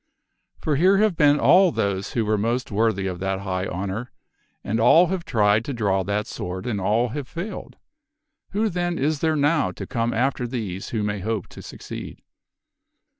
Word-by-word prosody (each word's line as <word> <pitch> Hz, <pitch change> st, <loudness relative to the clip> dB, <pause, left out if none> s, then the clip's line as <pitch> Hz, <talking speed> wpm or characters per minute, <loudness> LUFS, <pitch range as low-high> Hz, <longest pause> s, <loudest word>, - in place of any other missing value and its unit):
For 150 Hz, -3 st, -1 dB
here 190 Hz, +5 st, +5 dB
have 210 Hz, -3 st, +3 dB
been 145 Hz, -1 st, +4 dB
all 185 Hz, 0 st, +6 dB
those 100 Hz, -5 st, -2 dB
who 115 Hz, -2 st, 0 dB
were 110 Hz, +1 st, +2 dB
most 115 Hz, +5 st, -1 dB
worthy 105 Hz, -2 st, +1 dB
of 90 Hz, -2 st, -3 dB
that 95 Hz, 0 st, -2 dB
high 95 Hz, -1 st, -2 dB
honor, 100 Hz, +7 st, -4 dB, 0.5 s
and 110 Hz, +3 st, -1 dB
all 165 Hz, +9 st, +6 dB
have 185 Hz, -2 st, -2 dB
tried 105 Hz, -2 st, +2 dB
to 140 Hz, -, -3 dB
draw 100 Hz, -4 st, +1 dB
that 100 Hz, +2 st, -1 dB
sword 95 Hz, +3 st, -6 dB
and 110 Hz, -5 st, -2 dB
all 115 Hz, +6 st, +1 dB
have 135 Hz, +2 st, -5 dB
failed. 175 Hz, -, -7 dB, 0.7 s
Who 215 Hz, +3 st, 0 dB
then 175 Hz, -2 st, -2 dB
is 150 Hz, +2 st, 0 dB
there 160 Hz, 0 st, +1 dB
now 145 Hz, -, +2 dB
to -, -, -7 dB
come 115 Hz, -2 st, -1 dB
after 125 Hz, +1 st, 0 dB
these 105 Hz, -7 st, -5 dB
who 110 Hz, -3 st, -2 dB
may 105 Hz, -1 st, -2 dB
hope 110 Hz, 0 st, -2 dB
to -, -, -11 dB
succeed?" -, -, -9 dB
115 Hz, 180 wpm, -23 LUFS, 100-150 Hz, 0.7 s, all